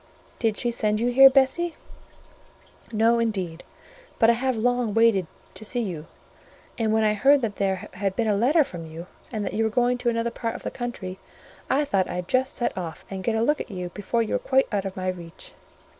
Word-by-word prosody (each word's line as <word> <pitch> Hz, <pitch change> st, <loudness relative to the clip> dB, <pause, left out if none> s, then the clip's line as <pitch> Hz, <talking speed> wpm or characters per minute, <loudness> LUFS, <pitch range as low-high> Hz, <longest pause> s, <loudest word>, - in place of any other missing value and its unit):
"Did 225 Hz, -3 st, 0 dB
she 240 Hz, -, 0 dB
send 215 Hz, -2 st, 0 dB
you 240 Hz, +2 st, +1 dB
here, 270 Hz, +2 st, +9 dB
Bessie?" 275 Hz, +6 st, +2 dB, 1.2 s
"No, 230 Hz, +1 st, +3 dB
indeed: 190 Hz, -8 st, -2 dB, 0.6 s
but 230 Hz, 0 st, +5 dB
I -, -, +3 dB
have 255 Hz, +1 st, -1 dB
long 245 Hz, -1 st, 0 dB
wanted 225 Hz, -6 st, +4 dB, 0.3 s
to -, -, -10 dB
see 240 Hz, +2 st, -2 dB
you, 165 Hz, -6 st, -5 dB, 0.7 s
and 220 Hz, -2 st, 0 dB
when 220 Hz, 0 st, +2 dB
I 210 Hz, -1 st, +3 dB
heard 270 Hz, +6 st, +4 dB
that 210 Hz, -3 st, -2 dB
there 190 Hz, -2 st, -1 dB
had 190 Hz, 0 st, -2 dB
been 230 Hz, +1 st, 0 dB
a 210 Hz, -, +2 dB
letter 280 Hz, +10 st, +4 dB
from 170 Hz, -, -8 dB
you, 165 Hz, +2 st, -8 dB, 0.3 s
and 215 Hz, -3 st, -3 dB
that -, -, -4 dB
you 225 Hz, -, +1 dB
were 220 Hz, -, +2 dB
going 245 Hz, +2 st, +1 dB
to 240 Hz, -, +1 dB
another 230 Hz, 0 st, -1 dB
part 230 Hz, -1 st, -4 dB
of -, -, -8 dB
the -, -, -3 dB
country, 200 Hz, -7 st, -6 dB, 0.5 s
I 290 Hz, +2 st, +2 dB
thought 195 Hz, -8 st, 0 dB
I'd 180 Hz, 0 st, -4 dB
just 260 Hz, +4 st, +1 dB
set 240 Hz, -, -1 dB
off, 170 Hz, -3 st, -6 dB
and 190 Hz, -1 st, -5 dB
get 225 Hz, +1 st, 0 dB
a 225 Hz, -, +1 dB
look 295 Hz, +4 st, +1 dB
at -, -, -7 dB
you 180 Hz, -3 st, -5 dB
before 210 Hz, +5 st, -1 dB
you 220 Hz, -, -4 dB
were -, -, +1 dB
quite 265 Hz, 0 st, +2 dB
out 200 Hz, -2 st, -1 dB
of 195 Hz, -1 st, -5 dB
my 185 Hz, 0 st, -3 dB
reach." 175 Hz, -2 st, -6 dB
225 Hz, 220 wpm, -25 LUFS, 190-245 Hz, 1.2 s, here